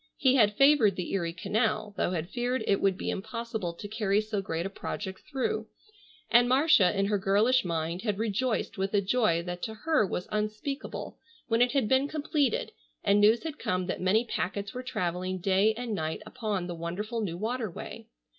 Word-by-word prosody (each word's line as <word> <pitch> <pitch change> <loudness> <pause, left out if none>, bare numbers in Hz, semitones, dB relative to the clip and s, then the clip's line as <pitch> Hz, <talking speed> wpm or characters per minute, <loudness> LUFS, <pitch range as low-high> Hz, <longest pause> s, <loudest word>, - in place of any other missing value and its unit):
He 260 -2 +4
had 210 -6 +4
favored 275 -7 +5
the 180 - -4
Erie 170 -4 0
canal, 210 +4 -1
though - - 0
had 175 -1 -3
feared 245 0 -1
it 200 - +2
would 195 -2 +2
be - - -2
impossible 220 -2 -4
to 190 +5 -8
carry 210 -1 +1
so 215 -1 -2
great 165 -2 -3
a - - -2
project 190 -1 -5
through, 300 +10 -1 0.6
and 240 +1 +6
Marcia 255 - +4
in 195 - +2
her 205 0 +1
girlish 215 +7 +3
mind 170 +1 -2
had 210 -4 -1
rejoiced 220 0 -1
with 195 +2 -1
a 200 - +4
joy 195 -5 +2
that 175 0 -5
to 220 - -4
her 305 +4 +2
was 180 -2 -3
unspeakable 215 +6 -4 0.3
when 230 +1 +3
it 245 +1 +3
had 270 -6 +2
been 265 +3 +3
completed 290 -4 0 0.3
and 205 +1 +4
news 220 +3 +5
had 315 -2 -5
come 185 0 -1
that 180 - -3
many 210 +6 +3
packets 200 -2 -3
were 250 - -4
travelling 185 -6 -2
day 195 +4 +3
and 240 -1 -4
night 160 +1 -3
upon 215 -5 -3
the 175 - -4
wonderful 195 +8 -4
new 175 -5 -3
water 225 +2 -2
way. 170 - -9
210 Hz, 195 wpm, -29 LUFS, 185-245 Hz, 0.6 s, and